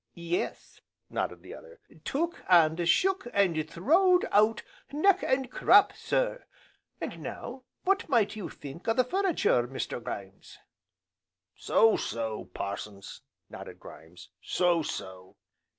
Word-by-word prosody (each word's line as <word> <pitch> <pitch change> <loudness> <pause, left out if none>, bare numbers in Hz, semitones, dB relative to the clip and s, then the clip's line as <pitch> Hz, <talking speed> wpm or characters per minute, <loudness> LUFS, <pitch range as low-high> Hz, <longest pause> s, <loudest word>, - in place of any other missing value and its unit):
"Yes," 170 +1 -4 0.3
nodded - - -3
the - - -10
other, 485 -1 -13 0.2
"took, 335 +5 -2
and 170 -1 +4
shook, 380 - +2
and 165 -6 +1
throwed 355 - +3
out 215 +2 +3 0.3
neck, 370 +6 +3
and 260 -1 0
crop, - - +5
sir! - - -1 0.5
And - - -5
now, 255 +1 -7 0.2
what 390 -2 +1
might 225 -6 +2
you 210 -4 -6
think 145 +7 -10
o' 225 - +2
the 255 - +4
furniture, 340 - +1
Mr. 130 -1 -5
Grimes?" 100 -2 -8 1.0
"So 225 -1 +3
so, 110 -2 -4
Parsons," 100 0 -7 0.3
nodded - - -10
Grimes, 80 +3 -13
"so 175 -2 +1
so!" 95 -9 -7
205 Hz, 120 wpm, -29 LUFS, -, 1.0 s, crop